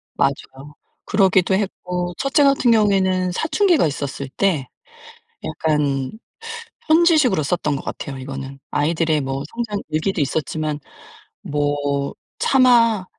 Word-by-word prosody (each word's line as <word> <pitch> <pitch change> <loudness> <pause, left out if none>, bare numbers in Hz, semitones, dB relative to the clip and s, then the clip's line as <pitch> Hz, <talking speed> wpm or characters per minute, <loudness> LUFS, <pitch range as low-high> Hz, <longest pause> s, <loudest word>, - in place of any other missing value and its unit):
맞아요. 135 +1 -2 0.3
그러기도 190 -2 +3
했고 180 -3 -3
첫째 275 +2 +2
같은 275 -3 +4
경우에는 190 -4 +2
사춘기가 325 - +2
있었을 140 -2 -4
때 155 -3 0 0.8
약간 145 -4 -1 0.8
편지식으로 315 - +4
썼던 150 -1 -1
것 135 - -5
같아요. 135 -1 -6
이거는 135 +1 -7
아이들의 155 +1 +1
뭐 135 0 -3
성장 230 -3 -3
일기도 160 +3 -1
있었지만 150 +1 -2 0.6
뭐 145 -1 -1 0.2
차마 235 -6 +4
165 Hz, 265 characters per minute, -21 LUFS, 145-210 Hz, 0.8 s, 같은